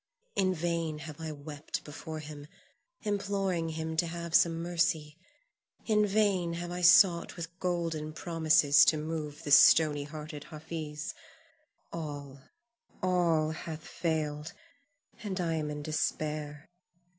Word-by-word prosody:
In 185 -1 +2
vain 165 -2 -1
have 155 0 -9
I 160 -1 -4
wept 145 0 -6
before 155 +1 -7
him, 150 -1 -9 0.6
imploring 195 -4 -1
him 160 0 -4
to 170 +1 +2
have 170 0 -6
some 165 -1 +4
mercy; 165 -3 0 0.7
in 210 -2 +3
vain 195 -4 +1
have 175 +1 -5
I 180 0 -4
sought 175 -1 +6
with 170 0 -7
golden 165 -4 -2
promises 155 -3 +4
to 155 - +4
move 155 -1 -5
the 145 - -4
stony 145 0 +6
hearted 150 0 -8
Hafiz, 155 -1 -6 0.8
all, 145 -4 -6 0.6
all 170 -4 +2
hath 160 0 -7
failed, 155 -2 -2 0.7
and 195 -3 -4
I 170 -2 0
am 155 -2 -2
in 150 0 -5
despair. 150 0 -3
160 Hz, 125 wpm, -30 LUFS, 150-170 Hz, 0.8 s, sought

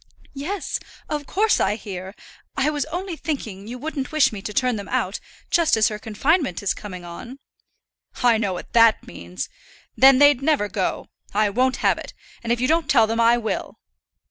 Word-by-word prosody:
"Yes; 325 +9 -3 0.3
of 295 -2 -3
course 430 +3 +2
I 200 +2 +1
hear. 190 -2 -8 0.4
I 285 +2 +2
was 290 -2 -2
only 350 +3 -4
thinking 220 - -5
you 245 +2 -6
wouldn't 280 -1 -4
wish 310 -6 +3
me 200 - -6
to 210 - -5
turn 250 +2 +1
them 200 -2 -7
out, 230 -6 -1 0.3
just 335 -7 +3
as 220 - +4
her 210 -1 -6
confinement 230 - 0
is 200 - +1
coming 185 -4 -9
on." 230 +10 -9 0.9
"I 235 -3 +4
know 205 -4 0
what 180 - -8
that 230 -1 +5
means. 85 +1 -7 0.5
Then 270 0 +7
they'd 285 -1 +5
never 280 -7 +2
go. 195 -1 -3 0.3
I 210 -1 +2
won't 255 +4 +1
have - - +3
it; - - -10 0.3
and 235 - -2
if 240 - +1
you 255 - +1
don't 320 -2 +1
tell 230 -5 +5
them 225 +1 -2
I 235 +1 +5
will." 225 -2 -4
240 Hz, 190 wpm, -22 LUFS, 210-290 Hz, 0.9 s, Then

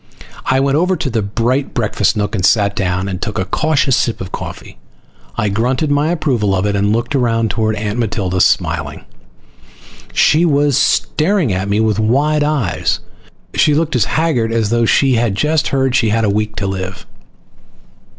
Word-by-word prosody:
I 130 - +2
went 140 +1 +1
over 180 +3 +1
to 145 -5 -3
the 115 -1 0
bright 120 +7 -1
breakfast 105 -3 0
nook 105 0 -2
and 95 -4 -2
sat 100 0 +2
down, 95 -1 -1
and 95 -1 -5
took 110 -3 -3
a 95 - -1
cautious 140 +4 +1
sip 115 - -1
of 95 0 -7
coffee. - - -8 0.6
I 105 - 0
grunted 125 +8 0
my 145 +2 +1
approval 125 - 0
of 95 +1 -1
it 100 -1 0
and 100 +1 +1
looked 115 +6 -1
around 115 -4 +1
toward 110 -1 -1
Aunt 105 +2 -3
Matilda, 95 -5 -1
smiling. - - 0 1.1
She 160 +3 +3
was 145 -4 +2
staring 160 - +1
at 95 +2 -2
me 105 +1 +1
with 110 -1 +1
wide 145 +7 +1
eyes. 145 - -1 0.5
She 150 - +3
looked 160 -1 0
as 125 - +2
haggard 150 -9 0
as 115 -2 0
though 120 0 +2
she 135 +3 +3
had 115 -4 0
just 155 +6 +1
heard 135 -2 0
she 115 -4 +2
had 115 +1 +1
a 100 - +1
week 105 +1 -2
to 100 - -3
live. 95 -1 -5
115 Hz, 180 wpm, -16 LUFS, 100-140 Hz, 1.1 s, She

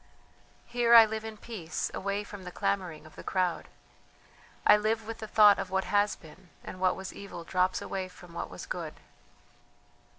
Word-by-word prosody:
"Here 240 -1 +4
I 230 -1 +11
live 220 0 -4
in 220 -1 -7
peace 200 -8 -4
away 200 +1 -2
from 205 -2 -10
the 180 - -7
clamouring 185 -6 -2
of 155 - -15
the - - -10
crowd; 185 -3 -1 1.0
I - - +8
live 220 +1 0
with 225 +1 -6
the 220 - -6
thought 210 -1 +6
of - - -3
what 190 0 0
has 205 0 +2
been, 175 +3 -16
and 185 - -8
what 185 -1 +3
was 190 0 -7
evil 200 -4 -8
drops 185 +2 0
away 190 -1 -3
from 180 -1 -15
what - - -4
was - - -8
good. - - -5
200 Hz, 185 wpm, -29 LUFS, 185-215 Hz, 1.0 s, I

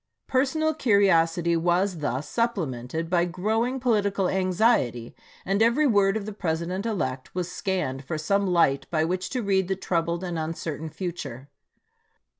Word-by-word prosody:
Personal 315 +4 +1
curiosity 175 - +3
was 175 +2 +1
thus 145 0 -2
supplemented 165 - -2
by 175 0 +2
growing 220 +8 -1
political 205 -6 +1
anxiety, 185 - +1 0.3
and 195 +3 +1
every 235 +7 +4
word 200 -5 +3
of 205 - -5
the 215 - -5
President 180 +2 -2
elect 130 - -3
was 180 -1 -2
scanned 180 -9 -2
for 155 +4 -4
some 200 +6 +1
light 170 -6 +2
by 160 -1 +1
which 180 +2 -2
to 250 -3 -2
read 190 -2 +1
the 190 - 0
troubled 170 -1 -1
and 175 -3 -3
un 160 +1 -3
certain 160 0 -5
future. 145 -7 -6
180 Hz, 150 wpm, -26 LUFS, 160-205 Hz, 0.3 s, every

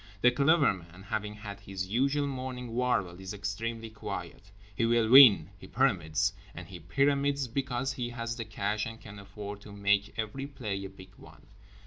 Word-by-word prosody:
The 125 - +6
Clever 145 +2 +4
Man, 90 0 -13
having 105 +1 -3
had 105 -1 -8
his 95 -2 -5
usual 135 +8 +1
morning 130 -3 -5
warble, 105 -8 0
is 95 +2 -6
extremely 110 +3 -4
quiet. 105 -2 -7 0.3
He 115 - 0
will 115 -1 +3
win, 115 - +8
he - - -11
pyramids—and 95 - -1
he 90 -1 -9
pyramids 140 - +1
because 130 +1 -2
he 120 -2 -3
has 115 -1 -4
the 115 -2 -5
cash 105 0 -2
and 115 0 -8
can 105 -2 -11
afford 100 0 -8
to 105 - -12
make 100 0 0
every 115 +5 -4
play 110 -9 -5
a - - -6
big 95 -1 -14
one. 80 -1 -16
110 Hz, 170 wpm, -30 LUFS, 100-125 Hz, 0.3 s, win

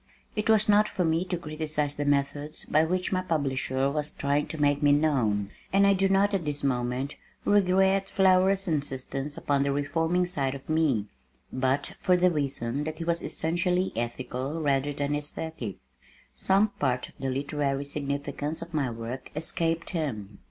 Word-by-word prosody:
It 215 +1 -1
was 215 -1 +5
not 210 0 +5
for 180 - -1
me 165 +2 +2
to 180 -1 -2
criticise 155 -2 -2
the 145 - -2
methods 145 +1 0
by 155 - +3
which 180 +2 -1
my 185 -1 +1
publisher 135 -5 0
was 150 0 -1
trying 140 +1 0
to 160 - -6
make 145 0 +2
me 145 -1 +5
known, 120 -10 +2 0.2
and 200 +1 +5
I 200 - +6
do 195 0 +2
not 195 +1 +3
at 195 -3 0
this 145 -2 -3
moment 125 +1 -1 0.3
regret 195 -1 +3
Flower's 190 +1 +3
insistence 140 -2 -2
upon 140 -1 +1
the 140 0 +1
reforming 165 +5 +1
side 140 -7 -1
of 135 - -10
me, 155 -9 +2 0.5
but 130 +2 0
for 180 -1 +4
the 180 0 +4
reason 140 -3 -2
that 155 0 -4
he 170 - -4
was 170 0 0
essentially 180 +3 0
ethical 125 +5 -3
rather 140 -2 +1
than 145 0 -2
esthetic, 145 -6 -4 0.6
some 200 +3 +3
part 125 -3 0
of - - -21
the 135 - -2
literary 140 +1 -1
significance 145 +2 -3
of 170 0 -12
my 140 -5 +1
work 115 +3 -6
escaped 165 +1 -1
him. 115 - -4
150 Hz, 170 wpm, -27 LUFS, 135-175 Hz, 0.6 s, I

